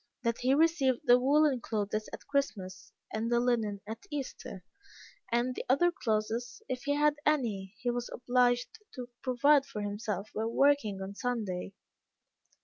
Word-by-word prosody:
That 235 -1 0
he 260 +2 +3
received 295 -5 +3
the 245 -3 +6
woollen 280 0 +3
clothes 215 -1 -2
at - - -9
Christmas, 200 -10 -3 0.2
and 225 +2 -2
the 240 - +4
linen 225 -5 0
at 220 +2 -8
Easter; 265 - -6 0.7
and 240 +2 +2
all - - -3
the - - -6
other 345 +7 +4
clothes, 230 - -2
if 255 -1 -4
he 285 0 +1
had 295 0 +3
any, 220 -11 0
he 245 - -1
was 240 0 -3
obliged 245 - +1 0.2
to 250 -1 -7
provide 275 +2 +3
for 215 -6 -5
himself 205 0 -4
by 220 - -2
working 230 -5 +2
on 195 +1 -6
Sunday. 205 -6 -3
245 Hz, 155 wpm, -31 LUFS, 215-275 Hz, 0.7 s, the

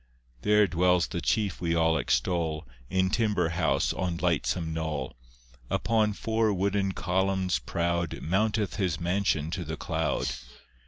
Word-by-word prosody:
There 105 +3 +4
dwells 90 -1 +2
the 85 - -4
chief 100 -3 0
we 85 -1 0
all 80 -1 +3
extol 80 +2 0 0.2
In 95 0 +1
timber 105 -7 +1
house 85 +1 +1
on 90 -2 -2
lightsome 85 -1 0
knoll; 80 -4 -3 0.5
Upon 110 -2 +1
four 110 +1 0
wooden 100 0 0
columns 95 0 0
proud 85 0 -1
Mounteth 105 +4 0
his 90 -7 0
mansion 85 -3 0
to 90 - -3
the 80 0 -5
cloud. 80 -5 -1
90 Hz, 130 wpm, -28 LUFS, 80-100 Hz, 0.5 s, There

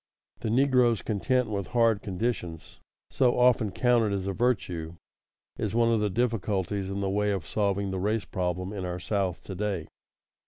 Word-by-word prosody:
The 110 - -3
negro's 125 -2 +3
content 125 +4 +1
with 100 -3 -3
hard 115 -3 +4
conditions, 95 -4 -4 0.3
so 125 -2 +2
often 125 -3 +4
counted 120 -3 +2
as 95 -2 -2
a 100 - -1
virtue, 90 -8 -1 0.6
is 110 0 -2
one 115 0 +3
of 115 - +2
the 105 0 +1
difficulties 100 -3 -1
in 100 +1 -3
the 100 - 0
way 105 +1 +1
of 95 -6 -2
solving 100 +3 0
the 95 - -2
race 105 +3 0
problem 90 +1 -3
in 100 -3 -4
our 90 0 -3
South 95 -2 -2
to 95 - -7
day. 95 -4 -2
105 Hz, 170 wpm, -28 LUFS, 95-115 Hz, 0.6 s, hard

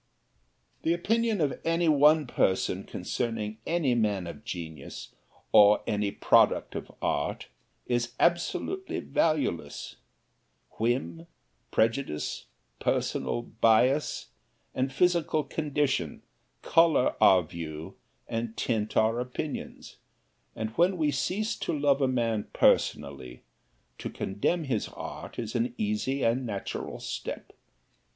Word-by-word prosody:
The 165 +1 +2
opinion 225 +2 +1
of 145 -3 -1
any 165 +1 +1
one 150 +1 +5
person 95 -6 0
concerning 110 -2 -3
any 165 -7 +2
man 105 -6 +1
of 85 +5 -8
genius, 85 -7 -7 0.4
or 105 0 +7
any 105 -1 0
product - - +3
of - - -6
art, - - -1 0.4
is 120 0 -1
absolutely 175 - 0
valueless. 150 - -1 0.8
Whim, 85 -8 -1 0.4
prejudice, 115 - 0 0.3
personal 120 - -1
bias, 120 +6 +2 0.4
and 130 +1 -1
physical 170 0 +2
condition 145 - -1 0.4
color 165 -5 +4
our 95 -2 +7
view 80 -1 -7 0.3
and 115 -1 -3
tint 110 -3 -1
our 110 +2 +3
opinions, 125 +4 -5 0.6
and 110 0 -3
when 175 +9 +2
we 155 -3 +2
cease 215 +8 -1
to 155 - -2
love 140 -1 +2
a 135 - +4
man 115 -4 0
personally, 65 -3 +1 0.6
to - - -4
condemn 105 - -1
his 125 -7 -1
art - - -8
is 115 -2 -4
an 120 0 -1
easy 105 +6 -1
and 120 +3 +2
natural 100 -5 -5
step. - - -6
120 Hz, 110 wpm, -28 LUFS, 105-150 Hz, 0.8 s, or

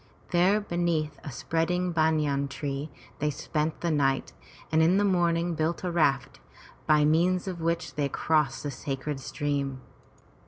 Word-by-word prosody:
There 185 +4 +4
beneath 170 -6 -1
a 145 - -6
spreading 175 +6 -1
banyan 155 -4 +1
tree 140 +1 -4 0.3
they 150 - +1
spent 150 +2 -2
the 170 - 0
night 135 -3 +1 0.4
and 160 0 +4
in 170 +4 +4
the 205 - +3
morning 175 -2 +2
built 160 +2 -1
a 180 - -1
raft, 135 -5 +1 0.5
by 150 -1 +5
means 175 +4 +2
of 180 -3 -4
which 165 +1 -1
they 145 -2 -1
crossed 150 -2 +1
the 145 - -3
sacred 135 +1 -4
stream. 140 -1 -2
155 Hz, 150 wpm, -28 LUFS, 145-170 Hz, 0.5 s, by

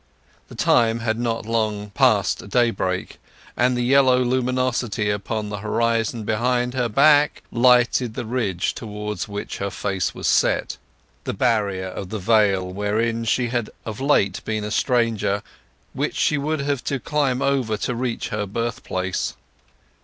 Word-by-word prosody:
The - - -12
time 115 0 +2
was 110 -1 +1
not 115 -2 -2
long 110 -2 -1
past 105 -6 +2
daybreak, 100 -6 0 0.4
and 125 0 +2
the 120 - 0
yellow 130 0 +5
luminosity 125 -4 0
upon 105 +1 -3
the 105 0 -5
horizon 115 +1 0
behind 120 +3 0
her 125 -2 0
back 145 +5 +4
lighted 125 -1 +3
the 125 - -4
ridge 110 -7 -1
towards 105 -1 -5
which 100 0 -6
her 100 - -2
face 95 -1 -2
was - - -6
set—the - - -1
barrier 100 -4 0
of 95 0 -7
the 110 - -3
vale 100 -2 +2
wherein 115 +3 -1
she 120 +2 +1
had 120 -2 -2 0.2
of 110 +3 -6
late 100 -10 +2
been 110 -1 -2
a 105 - -4
stranger—which 110 -5 -2
she 150 - +2
would 150 +1 -1
have 140 -2 -1
to 135 - -1
climb 135 -1 0
over 130 -6 +1
to 125 - -2
reach 120 -1 -3
her 105 -3 -2
birthplace. 100 -4 -3
115 Hz, 145 wpm, -22 LUFS, 105-125 Hz, 0.4 s, yellow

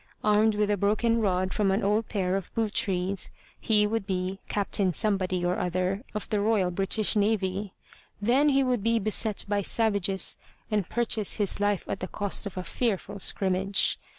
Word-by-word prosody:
Armed 215 +1 +3
with 210 0 +1
a 205 - +1
broken 225 +4 +1
rod 185 -2 0
from 205 -2 +1
an 195 +3 0
old 210 +3 +1
pair 190 -3 -1
of 195 -2 -4
boot 220 -2 -1
trees, 190 0 0 0.3
he 210 -2 +3
would 215 -1 -2
be 185 0 -2
Captain 200 -2 0
Somebody 185 -3 0
or 180 +1 0
other 185 +3 -1
of 210 - -4
the 210 -1 0
Royal 205 -4 +1
British 195 +4 0
Navy. 200 -2 0 0.4
Then 255 +8 +3
he 275 -1 +3
would 250 -4 0
be 230 +2 +2
beset 215 0 +2
by 205 0 0
savages 200 -2 +1 0.3
and 205 -5 0
purchase 225 -3 +1
his 205 -2 -1
life 205 -2 0
at - - -3
the 185 - -4
cost 205 +1 -2
of 195 - -9
a 185 - -3
fearful 205 -2 -2
scrimmage. 190 +1 +1
205 Hz, 180 wpm, -27 LUFS, 190-215 Hz, 0.4 s, Armed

